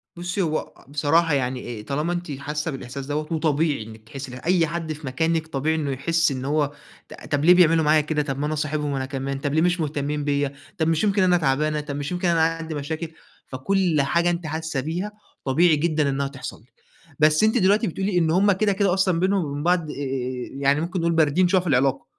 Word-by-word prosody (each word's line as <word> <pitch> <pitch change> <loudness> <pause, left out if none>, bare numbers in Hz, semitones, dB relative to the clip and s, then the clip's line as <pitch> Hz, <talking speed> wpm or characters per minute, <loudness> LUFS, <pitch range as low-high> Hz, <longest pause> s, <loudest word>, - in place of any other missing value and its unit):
بُصي، 175 +3 -3
هو 155 -3 -2
بصراحة 150 +3 +2
يعني 130 -2 0
إيه، 115 -4 -7
طالما 150 +7 -1
أنتِ 175 -3 -4
حاسة 150 +2 -3
بالإحساس 135 0 -7
دوّة، 150 +3 -3
وطبيعي 155 -4 +1
إنِك 110 0 -12
تحسي 135 -2 -7
ده، 125 - -8
أي 170 -1 +3
حد 165 0 -3
في 150 -1 -9
مكانِك 160 +5 0
طبيعي 155 +1 -1
إنه 150 -3 -1
يحس 165 +4 +1
إن 130 -1 -4
هو، 145 0 +1 0.4
ط - - -10 0.2
طب 145 +1 +1
ليه 175 - +8
بيعملوا 165 -2 +5
معايا 155 +1 +4
كده؟ 150 0 -1
طب 135 -2 -3
ما 145 - -1
أنا 155 - -1
صاحبهم 150 -1 -2
أنا 135 -1 -2
كمان، 135 0 -4
طب 140 0 -2
ليه 160 - +3
مش 180 +1 +2
مهتمين 150 -1 -2
بيّا؟ 145 -1 0 0.2
طب 160 -2 +1
مش 165 +2 +1
يمكن 200 -2 +2
أنا 180 -1 +4
تعبانة؟ 150 +1 +1
طب 145 -1 -5
مش 145 +2 -4
يمكن 180 0 -1
أنا 170 -1 +3
عندي 165 0 -1
مشاكل؟ 155 +3 -4 0.4
فكل 165 +4 +1
حاجة 170 +5 +2
أنتِ 170 -1 -2
حاسة 160 -1 -3
بيها 175 +8 -3 0.3
طبيعي 160 +5 +4
جدًا 155 -1 +1
إنها 140 0 -1
تحصل 135 -5 -8
لِك، 120 - -29 0.5
بس 155 +3 +4
أنتِ 220 +3 +3
دلوقتي 205 +2 +3
بتقولي 190 +2 -1
إن 165 -2 +2
هم 195 +4 +4
كده، 200 +1 +2
كده 195 -1 +2
أصلًا، 185 -2 +2
بينهم 190 -1 +1
وبين 145 0 -4
بعض، 175 -2 +1
آآ - - -8 0.6
يعني 140 +2 +2
ممكن 180 +3 -3
نقول 170 0 +1
باردين 165 +2 +3
شوية 185 0 +3
في 180 - -7
العلاقة، 135 -1 +2
155 Hz, 220 wpm, -23 LUFS, 140-170 Hz, 0.6 s, ليه